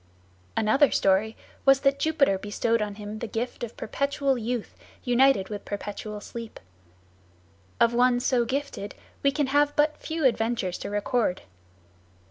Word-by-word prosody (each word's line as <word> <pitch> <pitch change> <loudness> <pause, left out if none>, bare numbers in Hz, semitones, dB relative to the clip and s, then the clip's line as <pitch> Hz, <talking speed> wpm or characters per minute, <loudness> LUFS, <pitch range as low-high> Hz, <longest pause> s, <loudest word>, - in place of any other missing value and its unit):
Another 265 +7 +4
story 200 +3 +2 0.3
was 270 0 +5
that 275 0 +2
Jupiter 280 -11 +2
bestowed 220 +3 0
on 205 -1 -3
him 210 +1 -7
the 235 - -4
gift 235 +3 -4
of 235 - -6
perpetual 280 +3 0
youth 240 -1 -4 0.3
united 245 -5 +3
with 205 -1 -6
perpetual 205 +1 -6
sleep. 230 +1 -8 1.2
Of 235 0 +4
one 245 0 +3
so 245 -1 +2
gifted 265 -5 -4 0.3
we 280 - +3
can 290 +1 0
have 290 +2 +2
but 300 +1 +2
few 320 -2 -3
adventures 225 -6 0
to - - -5
record. 205 -1 0
240 Hz, 140 wpm, -26 LUFS, 210-275 Hz, 1.2 s, was